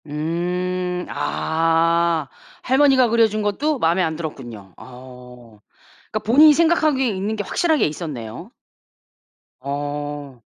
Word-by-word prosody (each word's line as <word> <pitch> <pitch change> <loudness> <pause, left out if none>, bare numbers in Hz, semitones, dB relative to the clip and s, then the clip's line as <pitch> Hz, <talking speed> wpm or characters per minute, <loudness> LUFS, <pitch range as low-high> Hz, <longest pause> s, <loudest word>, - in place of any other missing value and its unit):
음. 180 +4 -3
아 165 -1 0 0.4
할머니가 265 -2 +4
그려준 220 -2 +2
것도 270 +9 -1
마음에 170 +1 +2
안 160 -3 -1
들었군요. 120 - -8
어. 125 -3 -14 0.5
그러니까 215 - -1
본인이 295 +7 +7
생각하기에 310 -4 +2
있는 205 0 -2
게 210 - -3
확실하게 320 - +1
있었네요. 150 - -7 1.1
어. 145 -1 -5
170 Hz, 250 characters per minute, -21 LUFS, 145-220 Hz, 1.1 s, 본인이